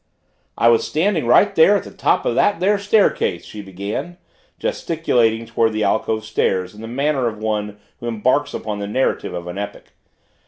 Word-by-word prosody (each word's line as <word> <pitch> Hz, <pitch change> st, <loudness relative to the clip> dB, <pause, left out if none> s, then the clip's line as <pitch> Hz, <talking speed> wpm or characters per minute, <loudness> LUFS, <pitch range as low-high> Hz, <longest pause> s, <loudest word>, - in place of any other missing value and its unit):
"I 115 Hz, -, +3 dB
was 115 Hz, -1 st, +3 dB
standing 160 Hz, -, 0 dB
right 120 Hz, -, +5 dB
there 195 Hz, +6 st, +5 dB
at -, -, -5 dB
the -, -, -11 dB
top -, -, 0 dB
of -, -, +1 dB
that 205 Hz, -4 st, +2 dB
there 200 Hz, +3 st, +2 dB
staircase," 205 Hz, 0 st, +1 dB
she 105 Hz, -, -8 dB
began, 100 Hz, -, -6 dB, 0.4 s
gesticulating 125 Hz, -, 0 dB
toward 115 Hz, -1 st, +1 dB
the 110 Hz, 0 st, -1 dB
alcove 110 Hz, +1 st, 0 dB
stairs 95 Hz, -4 st, -1 dB
in 105 Hz, -, -12 dB
the 115 Hz, -, -7 dB
manner 135 Hz, +1 st, 0 dB
of 110 Hz, -2 st, -4 dB
one 105 Hz, -1 st, -3 dB, 0.2 s
who 120 Hz, -, -6 dB
embarks 125 Hz, +6 st, 0 dB
upon 105 Hz, -1 st, -4 dB
the 100 Hz, -, -4 dB
narration 130 Hz, -3 st, -1 dB
of 85 Hz, 0 st, -5 dB
an 90 Hz, +3 st, -6 dB
epic. 100 Hz, 0 st, -7 dB
115 Hz, 185 wpm, -20 LUFS, 105-160 Hz, 0.4 s, right